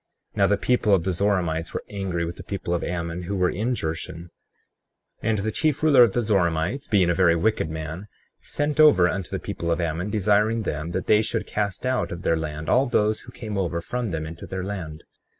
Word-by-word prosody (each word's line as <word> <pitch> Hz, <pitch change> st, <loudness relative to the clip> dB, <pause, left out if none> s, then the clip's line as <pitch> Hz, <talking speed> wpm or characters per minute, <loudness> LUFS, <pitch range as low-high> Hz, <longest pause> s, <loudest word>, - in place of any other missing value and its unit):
35:8 -, -, -19 dB
Now 100 Hz, -1 st, +4 dB
the 105 Hz, 0 st, +2 dB
people 115 Hz, -5 st, +3 dB
of 90 Hz, -, -1 dB
the 95 Hz, 0 st, 0 dB
Zoramites 85 Hz, -4 st, 0 dB
were -, -, -3 dB
angry 95 Hz, -4 st, -3 dB
with 85 Hz, +1 st, -6 dB
the 95 Hz, -, -8 dB
people 90 Hz, -2 st, -4 dB
of 85 Hz, -, -1 dB
Ammon 85 Hz, 0 st, -3 dB
who 95 Hz, +3 st, -4 dB
were 90 Hz, -2 st, +2 dB
in 115 Hz, +6 st, -1 dB
Jershon, 85 Hz, -1 st, -5 dB, 0.9 s
and 110 Hz, -1 st, +1 dB
the 105 Hz, +2 st, -1 dB
chief 155 Hz, +4 st, 0 dB
ruler 145 Hz, -5 st, +6 dB
of 115 Hz, -5 st, +6 dB
the 120 Hz, -, +1 dB
Zoramites, 95 Hz, -, 0 dB
being 95 Hz, -5 st, +3 dB
a -, -, +2 dB
very 85 Hz, -1 st, +4 dB
wicked 85 Hz, -1 st, +1 dB
man, 80 Hz, +5 st, -6 dB, 0.3 s
sent 145 Hz, +1 st, -2 dB
over 150 Hz, -13 st, +7 dB
unto 95 Hz, 0 st, -3 dB
the -, -, -2 dB
people 85 Hz, -, -4 dB
of 85 Hz, -, 0 dB
Ammon 85 Hz, +3 st, -2 dB
desiring 105 Hz, +2 st, +2 dB
them 75 Hz, -2 st, -3 dB
that -, -, -2 dB
they 105 Hz, 0 st, +5 dB
should 110 Hz, -, -2 dB
cast 105 Hz, +1 st, -2 dB
out 130 Hz, 0 st, 0 dB
of 85 Hz, +1 st, -6 dB
their 80 Hz, -, +2 dB
land 75 Hz, -1 st, -4 dB
all 130 Hz, +2 st, +3 dB
those 110 Hz, -2 st, +1 dB
who 125 Hz, -, -12 dB
came 105 Hz, -5 st, -5 dB
over 85 Hz, -3 st, -1 dB
from 120 Hz, +8 st, -3 dB
them 80 Hz, -3 st, -3 dB
into 80 Hz, +2 st, -8 dB
their 95 Hz, -1 st, -4 dB
land. 90 Hz, -6 st, -6 dB
95 Hz, 220 wpm, -24 LUFS, 85-110 Hz, 0.9 s, over